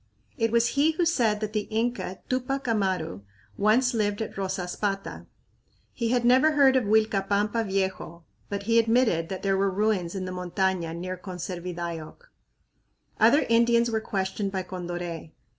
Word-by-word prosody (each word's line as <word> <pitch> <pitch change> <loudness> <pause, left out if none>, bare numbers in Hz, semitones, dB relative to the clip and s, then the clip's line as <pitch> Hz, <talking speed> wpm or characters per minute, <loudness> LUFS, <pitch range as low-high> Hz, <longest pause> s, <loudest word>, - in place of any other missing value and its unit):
It 225 -1 0
was 235 0 +3
he 290 +5 +2
who 345 +2 +1
said 230 -11 +1
that 215 0 -3
the 210 -2 -2
Inca 225 -4 -2
Tupac 260 +1 -2
Amaru 190 - -1 0.3
once 245 +5 +3
lived 205 -2 0
at - - -8
Rosaspata. 195 +1 -3 0.7
He 235 -2 -2
had 245 0 +1
never 260 +6 +5
heard 275 -3 +5
of 255 -4 +2
Uilcapampa 210 +1 +1
Viejo, 190 -4 -3 0.3
but 200 0 -3
he 230 +2 +3
admitted 225 -8 +2
that 190 - -5
there 195 -1 +2
were 195 0 +2
ruins 195 -3 0
in 185 -1 -3
the 185 - -5
montaña 180 -2 -1
near 185 +1 -5
Conservidayoc. 180 - -6 0.9
Other 290 - +5
Indians 235 0 +3
were 220 -1 0
questioned 195 -1 -2
by 190 -1 -2
Condoré. 175 -3 -6
205 Hz, 150 wpm, -26 LUFS, 185-235 Hz, 0.9 s, never